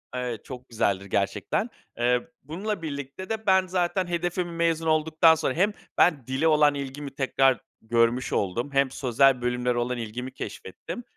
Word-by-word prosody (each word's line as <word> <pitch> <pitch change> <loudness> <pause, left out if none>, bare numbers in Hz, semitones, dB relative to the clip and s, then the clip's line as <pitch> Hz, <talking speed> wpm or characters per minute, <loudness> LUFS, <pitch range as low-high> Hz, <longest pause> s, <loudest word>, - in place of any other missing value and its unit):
Evet, 125 -4 -4
çok 130 -1 -9
güzeldir 100 -4 0
gerçekten. 100 0 -1 0.3
Eee, 125 +2 +1 0.2
bununla 185 +6 -4
birlikte 145 +5 -6
de 220 -1 -3
ben 190 -1 +4
zaten 180 0 0
hedefim 175 0 -2
mezun 165 -1 0
olduktan 160 +1 +4
sonra 150 -4 -1
hem 200 +5 +2 0.2
ben 145 -9 +3
dile 135 +5 +1
olan 150 -2 +4
ilgimi 140 0 -6
tekrar 135 -2 +2 0.2
görmüş 115 +2 +1
oldum 115 +8 -1
hem 135 -1 +2
sözel 130 0 +3
bölümlere 125 0 0
olan 120 +1 -1
ilgimi 120 +3 -5
keşfettim. 240 - -7
140 Hz, 150 wpm, -26 LUFS, 125-165 Hz, 0.3 s, ben